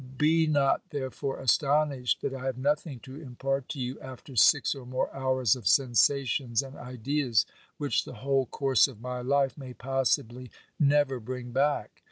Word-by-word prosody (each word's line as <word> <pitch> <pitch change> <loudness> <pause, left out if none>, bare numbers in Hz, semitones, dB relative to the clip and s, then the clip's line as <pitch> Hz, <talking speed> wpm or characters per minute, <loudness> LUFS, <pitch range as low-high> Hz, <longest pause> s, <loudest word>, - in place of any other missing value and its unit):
Be 160 +2 +3
not 145 -3 +2
there 130 -3 -4
fore 135 +1 -4
astonished 140 -1 +1
that - - -2
I 130 -1 -6
have 130 -2 -2
nothing 145 0 -1
to 135 +3 -10
impart 135 0 -3
to 145 - -5
you 125 +1 -4
after 130 +1 -11
six 110 - +5
or 135 -3 -10
more 130 +1 -3
hours 130 -4 +2
of 120 -7 -5
sensations 130 +1 +2
and 135 0 -10
ideas 125 -1 0 0.3
which 145 -2 0
the - - -10
whole 135 +3 0
course 135 -4 +3
of 125 -6 -12
my 125 +1 -5
life 140 +2 +1
may 130 -2 -9
possibly 125 -1 -1 0.3
never 145 -3 +3
bring 125 +1 -6
back. 140 +4 0
135 Hz, 170 wpm, -28 LUFS, 125-140 Hz, 0.3 s, six